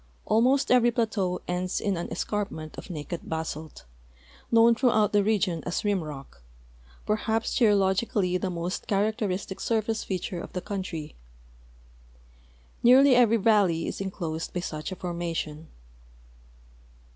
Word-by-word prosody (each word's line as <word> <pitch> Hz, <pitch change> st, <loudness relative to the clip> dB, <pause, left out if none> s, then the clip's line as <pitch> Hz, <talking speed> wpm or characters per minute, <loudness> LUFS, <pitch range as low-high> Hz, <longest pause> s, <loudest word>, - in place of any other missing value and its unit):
Almost 255 Hz, +5 st, +3 dB
every 245 Hz, -1 st, +5 dB
plateau 215 Hz, -6 st, -1 dB
ends 180 Hz, +1 st, -1 dB
in 200 Hz, -2 st, -1 dB
an 170 Hz, -, -5 dB
escarpment 195 Hz, -7 st, -3 dB
of -, -, -9 dB
naked 165 Hz, +1 st, -5 dB
basalt, 160 Hz, -, -5 dB, 0.7 s
kitown 230 Hz, 0 st, +6 dB
throughout 225 Hz, -4 st, +2 dB
the 205 Hz, -1 st, +4 dB
region 195 Hz, -6 st, +1 dB
as 180 Hz, +5 st, -3 dB
rim 200 Hz, -4 st, +1 dB
rock, 140 Hz, -, -9 dB, 0.6 s
perhaps 220 Hz, +1 st, 0 dB
geologically 200 Hz, -3 st, +2 dB
the 190 Hz, -, -2 dB
most 175 Hz, +1 st, -4 dB
characteristic 200 Hz, -2 st, -1 dB
surface 225 Hz, -1 st, -1 dB
feature 180 Hz, -2 st, -4 dB
of -, -, -10 dB
the 180 Hz, -, -3 dB
couTitry. 185 Hz, -6 st, -5 dB, 1.7 s
Nearly 260 Hz, +3 st, +7 dB
every 230 Hz, -2 st, +5 dB
valle}'' 200 Hz, -6 st, +3 dB
is -, -, -4 dB
inclosed 170 Hz, -5 st, -4 dB
by 180 Hz, -, -1 dB
such 155 Hz, 0 st, -5 dB
a -, -, -4 dB
formation. 170 Hz, -3 st, -4 dB
195 Hz, 125 wpm, -27 LUFS, 170-220 Hz, 1.7 s, Nearly